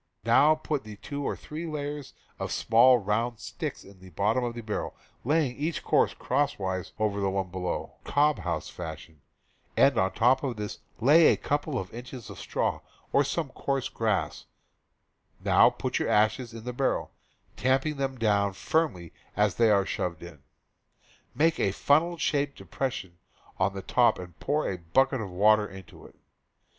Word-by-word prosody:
Now 155 Hz, +2 st, +5 dB
put 155 Hz, -2 st, -3 dB, 0.2 s
two 145 Hz, 0 st, -4 dB
or -, -, -1 dB
three 160 Hz, +3 st, -7 dB
layers 145 Hz, -2 st, -5 dB, 0.2 s
of -, -, -3 dB
small 120 Hz, +3 st, +5 dB
round 115 Hz, +3 st, -1 dB
sticks -, -, -5 dB
in 100 Hz, -1 st, -16 dB
the 95 Hz, 0 st, -13 dB
bottom 105 Hz, +8 st, 0 dB
of 120 Hz, -1 st, -3 dB
the 120 Hz, -, -5 dB
barrel, 105 Hz, -1 st, -4 dB, 0.3 s
laying 145 Hz, -2 st, +1 dB
each 155 Hz, +4 st, -3 dB
course -, -, +2 dB
cross 145 Hz, +2 st, 0 dB
wise 95 Hz, -2 st, -3 dB
of 110 Hz, -1 st, +1 dB
the 100 Hz, -, +1 dB
one 95 Hz, -1 st, -2 dB
below, 90 Hz, -1 st, -3 dB
cob 150 Hz, +1 st, +2 dB
house -, -, -3 dB
fashion, 80 Hz, -1 st, -9 dB, 0.6 s
and -, -, +5 dB
on 95 Hz, 0 st, +2 dB
top 125 Hz, +3 st, +3 dB
of 130 Hz, -4 st, -2 dB
this 105 Hz, -1 st, -5 dB, 0.2 s
lay 150 Hz, +7 st, +6 dB
a -, -, +4 dB
couple 145 Hz, -1 st, -1 dB
of 95 Hz, -5 st, -5 dB
inches 125 Hz, 0 st, -8 dB
of -, -, -10 dB
straw -, -, -1 dB, 0.3 s
or 140 Hz, -, +5 dB, 0.3 s
coarse 135 Hz, -2 st, -2 dB
grass; 100 Hz, -9 st, -1 dB, 0.9 s
now -, -, +5 dB
put -, -, -3 dB
your -, -, -1 dB
ashes 110 Hz, +3 st, +2 dB
in 115 Hz, -1 st, -9 dB
the 125 Hz, +1 st, -4 dB
barrel, 135 Hz, +2 st, -1 dB, 0.4 s
tamping 135 Hz, +3 st, +1 dB
them 135 Hz, -1 st, -2 dB
down 100 Hz, -3 st, +2 dB
firmly 95 Hz, -, -1 dB, 0.2 s
as 105 Hz, -2 st, +3 dB
they 115 Hz, +2 st, +3 dB
are 100 Hz, -2 st, +4 dB
shoveled 85 Hz, -3 st, -3 dB
in; 85 Hz, -5 st, -11 dB, 0.9 s
make 160 Hz, +5 st, +2 dB
a 100 Hz, -, +2 dB
funnel 160 Hz, -, +2 dB
shaped 145 Hz, -3 st, 0 dB
depression 95 Hz, -10 st, -4 dB, 0.4 s
in 95 Hz, +1 st, +2 dB
the 95 Hz, -1 st, -6 dB
top 120 Hz, -3 st, +3 dB
and 90 Hz, -3 st, -10 dB
pour 150 Hz, +1 st, 0 dB
a 95 Hz, -, -3 dB
bucket 130 Hz, +10 st, +1 dB
of 100 Hz, -, -5 dB
water 105 Hz, +3 st, +4 dB
into 95 Hz, -2 st, -12 dB
it. -, -, -20 dB
115 Hz, 170 wpm, -28 LUFS, 95-140 Hz, 0.9 s, lay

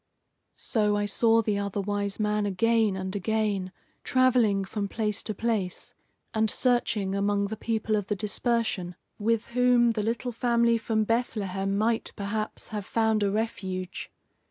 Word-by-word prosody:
So 210 Hz, -3 st, 0 dB
I 205 Hz, -, 0 dB
saw 225 Hz, +2 st, +3 dB
the 205 Hz, -1 st, 0 dB
Other 200 Hz, 0 st, -2 dB
Wise 200 Hz, 0 st, -2 dB
Man 210 Hz, -1 st, +1 dB
again 220 Hz, +1 st, +2 dB
and 190 Hz, +1 st, -4 dB
again, 205 Hz, -2 st, -1 dB, 0.3 s
travelling 245 Hz, -7 st, +3 dB
from 200 Hz, +1 st, -3 dB
place 210 Hz, 0 st, -1 dB
to 215 Hz, -, -4 dB
place, 210 Hz, -5 st, -2 dB, 0.4 s
and 220 Hz, 0 st, +2 dB
searching 230 Hz, -6 st, +1 dB
among 200 Hz, 0 st, +1 dB
the 220 Hz, -, -3 dB
people 220 Hz, 0 st, -1 dB
of 205 Hz, -2 st, -2 dB
the 210 Hz, -, 0 dB
dispersion, 210 Hz, -3 st, -1 dB, 0.2 s
with 225 Hz, +1 st, 0 dB
whom 245 Hz, -1 st, +4 dB
the 220 Hz, -2 st, -1 dB
little 230 Hz, +3 st, -2 dB
family 235 Hz, 0 st, +2 dB
from 220 Hz, -1 st, 0 dB
Bethlehem 200 Hz, -4 st, -1 dB
might, 225 Hz, +2 st, 0 dB
perhaps, 215 Hz, +2 st, -4 dB
have 210 Hz, -3 st, -4 dB
found 220 Hz, -1 st, +1 dB
a 200 Hz, -, +2 dB
refuge. 190 Hz, -4 st, -3 dB
215 Hz, 150 wpm, -27 LUFS, 200-230 Hz, 0.4 s, whom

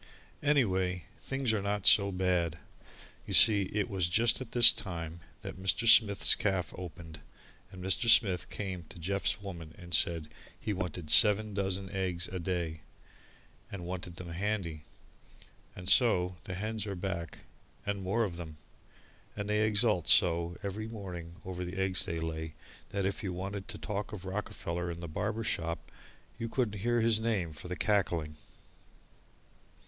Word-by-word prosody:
Anyway, 95 Hz, -, +1 dB
things 135 Hz, -4 st, -1 dB
are 105 Hz, -, 0 dB
not 100 Hz, 0 st, -2 dB
so 100 Hz, -1 st, +6 dB
bad. 90 Hz, -3 st, 0 dB, 0.7 s
You -, -, +1 dB
see 100 Hz, -4 st, +8 dB
it 105 Hz, -1 st, -1 dB
was 95 Hz, -3 st, -1 dB
just 115 Hz, +7 st, +2 dB
at 125 Hz, -, -8 dB
this 120 Hz, -2 st, +8 dB
time 85 Hz, -3 st, -6 dB, 0.2 s
that 95 Hz, -, -8 dB
Mr. 105 Hz, +5 st, +1 dB
Smith's 105 Hz, -3 st, +6 dB
caff 95 Hz, -3 st, -1 dB
opened, 80 Hz, -3 st, -9 dB, 0.5 s
and 95 Hz, -2 st, -10 dB
Mr. 95 Hz, +5 st, +2 dB
Smith 95 Hz, -6 st, +4 dB
came 95 Hz, -3 st, -5 dB
to -, -, -9 dB
Jeff's 100 Hz, +4 st, -1 dB
Woman 85 Hz, -5 st, -8 dB
and 85 Hz, -1 st, -10 dB
said 80 Hz, -1 st, +2 dB, 0.3 s
he 110 Hz, -, -3 dB
wanted 90 Hz, -4 st, -3 dB
seven 105 Hz, +3 st, +6 dB
dozen 95 Hz, -1 st, -2 dB
eggs 90 Hz, -3 st, -2 dB
a 95 Hz, -, -5 dB
day, 85 Hz, -2 st, -3 dB, 0.9 s
and 95 Hz, -3 st, -6 dB
wanted 90 Hz, -1 st, -6 dB
them 90 Hz, 0 st, -7 dB
handy, 85 Hz, -4 st, -3 dB, 0.9 s
and 90 Hz, -1 st, -9 dB
so 90 Hz, -7 st, +4 dB
the 95 Hz, -, -5 dB
hens 110 Hz, +2 st, -4 dB
are 100 Hz, -, -4 dB
back, 90 Hz, -4 st, -5 dB, 0.4 s
and 100 Hz, -1 st, -2 dB
more 100 Hz, +5 st, 0 dB
of 90 Hz, -6 st, -4 dB
them, 80 Hz, -3 st, -8 dB, 0.8 s
and 105 Hz, -1 st, -4 dB
they 105 Hz, 0 st, +2 dB
exult 105 Hz, -5 st, +1 dB
so 85 Hz, 0 st, +4 dB
every 105 Hz, +2 st, -4 dB
morning 90 Hz, -6 st, -8 dB
over 90 Hz, -1 st, -5 dB
the 90 Hz, +2 st, -6 dB
eggs 95 Hz, -1 st, +3 dB
they 85 Hz, -, -3 dB
lay 80 Hz, -1 st, -4 dB, 0.3 s
that 100 Hz, -1 st, -2 dB
if 100 Hz, -, -2 dB
you 95 Hz, -3 st, -3 dB
wanted 95 Hz, +2 st, -5 dB
to -, -, -7 dB
talk 105 Hz, 0 st, -4 dB
of 95 Hz, -3 st, -7 dB
Rockefeller 90 Hz, -3 st, -4 dB
in 85 Hz, 0 st, -6 dB
the 85 Hz, -, -6 dB
barber 105 Hz, +8 st, -3 dB
shop 85 Hz, -5 st, -3 dB, 0.5 s
you 115 Hz, -1 st, -3 dB
couldn't 110 Hz, -5 st, -1 dB
hear 120 Hz, +3 st, +1 dB
his 110 Hz, -1 st, +3 dB
name 105 Hz, -8 st, -1 dB
for 75 Hz, -, -10 dB
the 90 Hz, -, -4 dB
cackling. 85 Hz, -7 st, 0 dB
95 Hz, 160 wpm, -31 LUFS, 85-105 Hz, 0.9 s, see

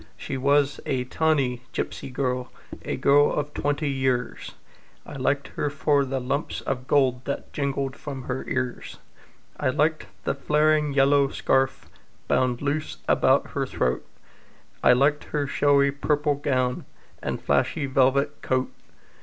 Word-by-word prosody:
She 135 Hz, -, -5 dB
was 140 Hz, +2 st, +2 dB
a 130 Hz, -2 st, 0 dB
tawny 130 Hz, -3 st, 0 dB
gipsy -, -, -4 dB
girl, 125 Hz, -1 st, -2 dB, 0.3 s
A -, -, -3 dB
girl 145 Hz, +1 st, +4 dB
of 145 Hz, 0 st, -2 dB
twenty 145 Hz, +1 st, -1 dB
years, 130 Hz, -2 st, -1 dB, 0.5 s
I -, -, -10 dB
liked 140 Hz, +1 st, -1 dB
her 145 Hz, -, -2 dB
for 145 Hz, 0 st, +2 dB
the 135 Hz, 0 st, -2 dB
lumps 135 Hz, +4 st, -2 dB
of 130 Hz, -1 st, -4 dB
gold 130 Hz, -3 st, +2 dB
That 140 Hz, -, -5 dB
jingled 140 Hz, -1 st, -2 dB
from 140 Hz, -3 st, -7 dB
her 125 Hz, +1 st, -3 dB
ears; 130 Hz, -2 st, -3 dB, 0.6 s
I -, -, +1 dB
liked 155 Hz, +4 st, 0 dB, 0.2 s
the -, -, 0 dB
flaring 150 Hz, 0 st, +2 dB
yellow 140 Hz, 0 st, +4 dB
scarf 135 Hz, -1 st, 0 dB, 0.4 s
Bound 125 Hz, 0 st, +1 dB
loose 150 Hz, +2 st, -2 dB
around -, -, +3 dB
her -, -, -2 dB
throat, 65 Hz, 0 st, -1 dB, 0.8 s
I -, -, +7 dB
liked 140 Hz, +4 st, +2 dB
her 145 Hz, -1 st, -2 dB
showy 140 Hz, 0 st, +3 dB
purple 145 Hz, +1 st, 0 dB
gown 130 Hz, -3 st, -1 dB, 0.4 s
And -, -, -3 dB
flashy 145 Hz, -, 0 dB
velvet 140 Hz, +2 st, +2 dB
coat. 130 Hz, 0 st, 0 dB
140 Hz, 140 wpm, -25 LUFS, 130-145 Hz, 0.8 s, I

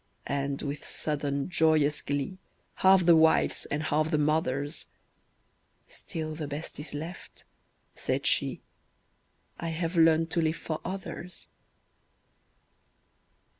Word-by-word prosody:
And 140 Hz, 0 st, -2 dB
with 145 Hz, 0 st, -4 dB
sudden, 140 Hz, -2 st, -2 dB
joyous 155 Hz, -4 st, +2 dB
glee, 145 Hz, +7 st, -3 dB, 0.4 s
Half 190 Hz, -1 st, +5 dB
the 170 Hz, -1 st, +7 dB
wife's 160 Hz, 0 st, +3 dB
and 150 Hz, +2 st, -2 dB
half 155 Hz, 0 st, +1 dB
the 155 Hz, -, +2 dB
mother's, 145 Hz, -1 st, 0 dB, 1.0 s
"Still 155 Hz, -1 st, -6 dB
the 155 Hz, -1 st, -5 dB
best 145 Hz, +2 st, -6 dB
is 150 Hz, 0 st, -6 dB
left," 160 Hz, +5 st, -8 dB, 0.5 s
said -, -, -2 dB
she: -, -, +2 dB, 1.0 s
"I 170 Hz, -, -3 dB
have 165 Hz, +2 st, -2 dB
learned 165 Hz, 0 st, +4 dB
to 170 Hz, -, +2 dB
live 160 Hz, 0 st, +1 dB
for 155 Hz, -2 st, -4 dB
others." 180 Hz, -1 st, -7 dB
155 Hz, 115 wpm, -29 LUFS, 145-165 Hz, 1.0 s, the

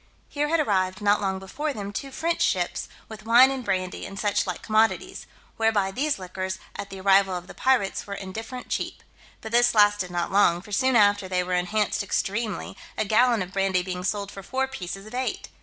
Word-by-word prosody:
Here 295 Hz, 0 st, -1 dB
had 330 Hz, +2 st, +2 dB
arrived, 190 Hz, -8 st, +1 dB
not 205 Hz, 0 st, +2 dB
long 190 Hz, -1 st, -1 dB
before 280 Hz, +11 st, -4 dB
them, 205 Hz, -3 st, -6 dB
two 275 Hz, +7 st, -4 dB
French 330 Hz, +5 st, -2 dB
ships, -, -, 0 dB, 0.2 s
with 215 Hz, -1 st, -10 dB
wine 240 Hz, +4 st, +6 dB
and 265 Hz, -2 st, -4 dB
brandy, 185 Hz, -4 st, -2 dB
and 195 Hz, -, -9 dB
suchlike 200 Hz, -4 st, -1 dB
commodities; 225 Hz, -, +1 dB, 0.3 s
whereby 220 Hz, -4 st, +2 dB
these 285 Hz, +8 st, 0 dB
liquors, 185 Hz, 0 st, -4 dB, 0.2 s
at 200 Hz, -, -6 dB
the 195 Hz, -1 st, -8 dB
arrival 195 Hz, 0 st, +4 dB
of 175 Hz, 0 st, -5 dB
the -, -, -11 dB
pirates, 250 Hz, -9 st, +1 dB
were 200 Hz, -, -4 dB
indifferent 225 Hz, +6 st, -7 dB
cheap. -, -, -3 dB, 0.4 s
But 220 Hz, -, -7 dB
this 240 Hz, 0 st, +4 dB
lasted 205 Hz, -3 st, +4 dB
not 175 Hz, -1 st, -2 dB
long, 180 Hz, -3 st, +3 dB
for 210 Hz, -, -13 dB
soon 260 Hz, +5 st, +2 dB
after 205 Hz, -3 st, +4 dB
they 180 Hz, -1 st, +1 dB
were 180 Hz, 0 st, -3 dB
enhanced 205 Hz, +4 st, 0 dB
extremely, 205 Hz, +1 st, -2 dB, 0.2 s
a 215 Hz, -, 0 dB
gallon 230 Hz, 0 st, +3 dB
of 185 Hz, +1 st, -11 dB
brandy 195 Hz, -2 st, +1 dB
being 180 Hz, 0 st, -5 dB
sold 200 Hz, +1 st, -2 dB
for 195 Hz, -, -9 dB
four 265 Hz, +6 st, -1 dB
pieces 195 Hz, -6 st, -7 dB
of 215 Hz, -, -12 dB
eight. 255 Hz, +1 st, -3 dB
205 Hz, 200 wpm, -25 LUFS, 190-235 Hz, 0.4 s, wine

